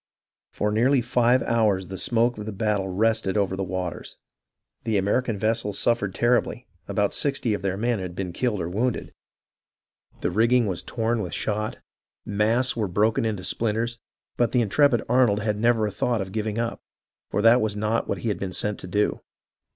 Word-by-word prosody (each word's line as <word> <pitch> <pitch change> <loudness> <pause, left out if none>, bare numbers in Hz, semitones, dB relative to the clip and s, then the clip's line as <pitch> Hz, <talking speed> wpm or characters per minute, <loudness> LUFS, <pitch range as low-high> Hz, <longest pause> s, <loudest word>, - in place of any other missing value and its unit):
For 105 - -1
nearly 125 +6 +3
five 120 +1 +2
hours 105 -5 +1
the 95 +1 -7
smoke 120 +1 +1
of 105 -1 -6
battle 105 -3 0
rested 110 +1 +1
over 95 -2 +1
the 95 - -2
waters. 90 -3 -5 0.7
The 110 -2 0
American 105 +3 0
vessels 110 -1 0
suffered 105 -5 0
terribly, 120 0 +1 0.2
about 100 0 0
sixty 135 -6 0
of 100 - -3
their 95 -1 -2
men 115 +1 0
had 90 -2 -6
been 90 -2 -4
killed 115 -1 -1
or 85 - -2
wounded, 110 +7 -2 1.1
the - - 0
rigging 115 +5 +3
was 95 -4 -2
torn 115 -1 -1
with 90 - -4
shot, 105 0 -2 0.5
masts 110 +5 +1
were 110 -3 -1
broken 105 +5 +1
into 105 -4 -2
splinters, 115 +3 -1 0.4
but 120 -1 +1
the 125 - +4
intrepid 120 +3 +3
Arnold 120 -4 +3
had 105 -1 -1
never 115 -1 +3
a 105 - -2
thought 120 +3 0
of 95 -1 -4
giving 110 +1 -2
up, 115 0 -2 0.5
for 105 - -1
that 115 +2 +6
was 110 -1 -1
not 110 +2 -1
what - - -1
he 115 - -3
had 105 - -2
been 95 -2 -4
sent 105 +2 -1
to - - -8
do. 105 +3 0
110 Hz, 180 wpm, -25 LUFS, 100-120 Hz, 1.1 s, that